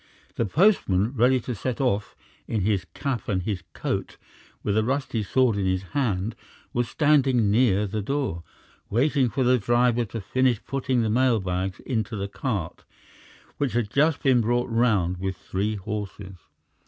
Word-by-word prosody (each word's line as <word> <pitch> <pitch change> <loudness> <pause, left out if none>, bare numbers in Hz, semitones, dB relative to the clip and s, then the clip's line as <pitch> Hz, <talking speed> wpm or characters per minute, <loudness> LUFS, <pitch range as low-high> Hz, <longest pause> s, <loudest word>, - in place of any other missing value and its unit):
The 115 - 0
postman, 115 - +3
ready 130 +1 +3
to 125 - -4
set 120 +3 -3
off, 105 -6 0 0.3
in 110 - -1
his 100 -1 0
cap 135 -5 -3
and 95 -3 0
his 100 -3 -2
coat, - - -3 0.5
with 100 - 0
a 110 - +3
rusty 130 -2 -1
sword 115 +1 +2
in 95 -2 0
his 95 0 0
hand, 110 -6 0 0.4
was 120 -1 0
standing 135 -8 +3
near 105 -3 +3
the 105 +2 -3
door, 130 - -2 0.5
waiting 130 +3 +2
for 130 - 0
the 125 0 +4
driver 120 +2 +2
to 115 +2 -6
finish 125 +3 +1
putting 130 -3 0
the 110 - 0
mail 125 -1 +3
bags 95 0 -3
into 110 -3 -2
the 100 -1 -3
cart 100 -5 -4 0.8
which 140 -6 0
had 115 -3 -1
just 150 +1 +2
been 130 -3 +4
brought 120 +2 0
round 105 -7 +2
with 95 0 -3
three 100 +4 -2
horses. 100 -1 -6
115 Hz, 165 wpm, -25 LUFS, 100-130 Hz, 0.8 s, the